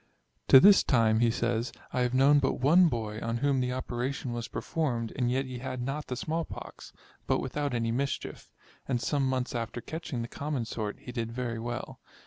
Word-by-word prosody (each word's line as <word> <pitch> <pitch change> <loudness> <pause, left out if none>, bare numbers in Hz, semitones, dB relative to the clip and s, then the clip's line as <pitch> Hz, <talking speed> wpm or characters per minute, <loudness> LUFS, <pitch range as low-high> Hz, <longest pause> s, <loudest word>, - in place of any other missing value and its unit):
To 135 - +10
this 200 +6 +8
time, 110 -3 +3
he 120 0 +4
says, 120 0 -1 0.2
I - - 0
have 125 0 +1
known 140 +2 +6
but 135 -1 +1
one 165 +8 +5
boy, 110 -6 -3
on 115 0 -1
whom 140 +1 +1
the 125 0 0
operation 125 0 -3
was 120 -1 -4
performed, 120 -9 -2
and 125 -3 0
yet 130 +2 0
he 130 -1 -6
had 130 0 -5
not 135 +4 -3
the 125 - -3
small 160 +6 -2
pox, - - -10 0.4
but - - +3
without 140 0 -2
any 115 -1 0
mischief; 135 +4 -3 0.4
and 125 -3 0
some 140 +3 0
months 130 -1 -1
after 115 0 -3
catching 140 -3 -5
the - - -5
common 140 -2 -3
sort, 110 -2 -4
he 125 - -8
did 115 -2 -3
very 120 -1 -3
well. 120 +1 -5
125 Hz, 200 wpm, -29 LUFS, 115-140 Hz, 0.4 s, To